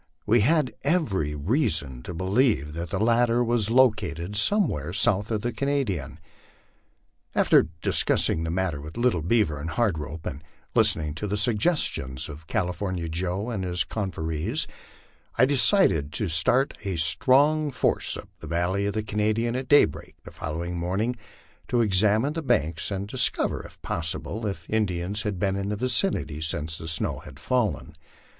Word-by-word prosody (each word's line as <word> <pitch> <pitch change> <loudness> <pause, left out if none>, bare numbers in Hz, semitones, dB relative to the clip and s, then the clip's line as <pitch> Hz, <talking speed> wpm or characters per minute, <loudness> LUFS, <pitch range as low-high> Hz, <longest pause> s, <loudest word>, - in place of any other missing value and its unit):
We 115 +3 +4
had 150 +4 +2
every 95 - 0
reason 75 - 0
to 90 - -7
believe 95 - +1
that 85 +1 -5
the 95 - -2
latter 120 +2 +2
was 115 -3 0
located 105 -8 +1
somewhere 105 - +1
south 105 0 +2
of 110 -2 -1
the 120 +2 -2
Canadian. 125 - -2 1.2
After - - +4 0.2
discussing 80 - +4
the 80 - -3
matter 85 -4 -2
with 75 +2 -10
Little 120 -8 +1
Beavt 100 +1 +2
r 75 - -6
and 80 +3 -5
Hard 95 -2 0
Rope, 75 +2 -7
and 70 +3 -6 0.3
listening 75 -1 +2
to 105 +7 -5
the 105 +1 -2
suggestions 105 - 0
of 80 +2 -11
California 90 -3 -2
Joe 90 +7 -3
and 100 -5 -3
his 90 -1 0
confreres, 90 - -3 0.7
I 125 - +5
decided 125 - +3
to 105 - -2
start 105 - +2
a 95 -3 -2
strong 135 - +3
force 135 - +1
up - - -10
the - - -9
valley 90 +4 -1
of 100 - -3
the 110 - -1
Canadian 110 +3 -1
at 130 0 -4
daybreak 145 - +2
the - - -11
following 85 +3 -5
morning, 100 +8 -1 0.5
to 120 -1 +2
ex 95 -4 +3
amine 110 +7 +2
the 165 - -3
banks 90 - 0
and 100 0 -4
discover, 120 +2 0
if - - -14
possible, 85 +7 -2
if 100 - -6
Indians 100 -2 -1
had 105 -3 -3
been 95 0 0
in 100 0 -3
the 105 - -1
vicinity 120 - +1
since 80 +1 -1
the 80 - -7
snow 80 -1 -1
had 65 - -13
fallen. 115 - -1
100 Hz, 165 wpm, -25 LUFS, 80-120 Hz, 1.2 s, I